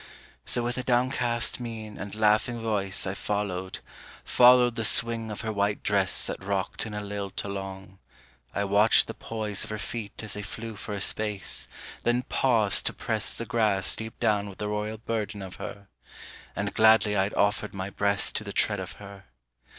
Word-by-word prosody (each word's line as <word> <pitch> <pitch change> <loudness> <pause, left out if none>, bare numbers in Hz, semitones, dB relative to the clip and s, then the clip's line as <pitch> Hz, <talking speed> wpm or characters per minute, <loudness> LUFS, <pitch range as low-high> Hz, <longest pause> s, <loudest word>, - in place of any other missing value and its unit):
So 120 - +2
with 120 +1 -1
a - - -2
downcast 125 -2 +1
mien 110 -3 -6
and 100 +2 -6
laughing 110 +2 +2
voice 100 -4 -1
I 95 - -2
followed, 100 -2 -3 0.4
followed 125 -1 +6
the 115 - -2
swing 115 +3 +2
of 105 - -5
her 110 -1 -3
white 100 0 0
dress 100 -2 +3
That - - -4
rocked 100 +2 -1
in 105 - -6
a 105 - -3
lilt 100 -1 -4
along: 95 -1 -6 0.5
I 100 - -1
watched 100 +2 +5
the - - -6
poise 110 -3 -2
Of - - -8
her 110 - -3
feet 105 0 -6
as 110 - -3
they 105 - -4
flew 110 +3 -7
for 105 +1 -6
a 100 - -4
space, 105 - -1 0.3
then 120 +1 +1
paused 115 -7 +2
to - - 0
press - - -1
The - - -3
grass 105 -5 +1
deep 110 0 -7
down 105 -1 +1
with 95 - -11
the 105 - -3
royal 105 +1 -2
burden 110 -2 -3
of 95 -1 -9
her: 100 -3 -7 0.7
And 100 0 -2
gladly 110 -1 +5
I'd 95 +1 +1
offered 105 0 +1
my 95 +1 -4
breast 100 -1 +2
to - - -3
the - - -7
tread - - +2
of - - -6
her. 100 -1 -12
105 Hz, 185 wpm, -27 LUFS, 100-115 Hz, 0.7 s, followed